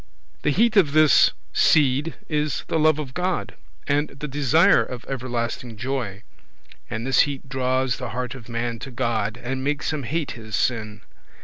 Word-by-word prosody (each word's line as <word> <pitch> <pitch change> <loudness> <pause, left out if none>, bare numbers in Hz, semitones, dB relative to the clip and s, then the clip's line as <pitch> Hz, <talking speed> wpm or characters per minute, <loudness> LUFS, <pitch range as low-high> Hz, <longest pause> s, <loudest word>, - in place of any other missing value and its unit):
The - - +1
heat 220 +9 +3
of 155 -8 +4
this 155 -1 +6 0.2
seed 145 +1 +3
is 150 -2 -1
the 160 - 0
love 155 -1 +4
of 140 -4 -5
God, 180 +1 -2 0.3
and 145 +1 +1
the 150 +2 -7
desire 145 +3 +4
of 125 -1 -8
everlasting 120 -3 -4
joy; 120 -5 -3 0.7
and 110 +2 -4
this 135 - +2
heat 140 0 -7
draws 130 -1 0
the - - -5
heart 125 +3 -4
of 120 -3 -11
man 115 0 -3
to 135 - -7
God, 115 -4 -1
and 130 +2 -4
makes 150 +2 -1
him 150 - -2
hate 150 +4 -2
his 110 -2 -6
sin. 110 -4 -1
130 Hz, 170 wpm, -23 LUFS, 120-150 Hz, 0.7 s, this